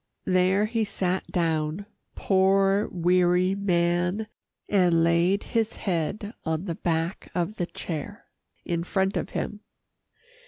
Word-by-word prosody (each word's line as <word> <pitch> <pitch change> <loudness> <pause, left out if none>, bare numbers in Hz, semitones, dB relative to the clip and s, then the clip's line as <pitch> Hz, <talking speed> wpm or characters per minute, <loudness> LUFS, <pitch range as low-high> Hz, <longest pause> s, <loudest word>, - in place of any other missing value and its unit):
There 185 +3 +3
he 225 +1 0
sat 190 -3 -2
down 160 +1 -1 0.3
poor, 195 +1 +3
weary 180 +1 +2
man, 180 +1 +1 0.4
and 175 -5 +3
laid 170 +4 +2
his 225 -2 -1
head 195 +4 -2
on 160 +2 -2
the 175 - -2
back 165 +1 -2
of 180 +4 -1
the 175 - -1
chair 180 +8 -6 0.4
in 170 -1 -1
front 190 +2 0
of - - -2
him. 210 - -3
185 Hz, 120 wpm, -26 LUFS, 170-200 Hz, 0.4 s, There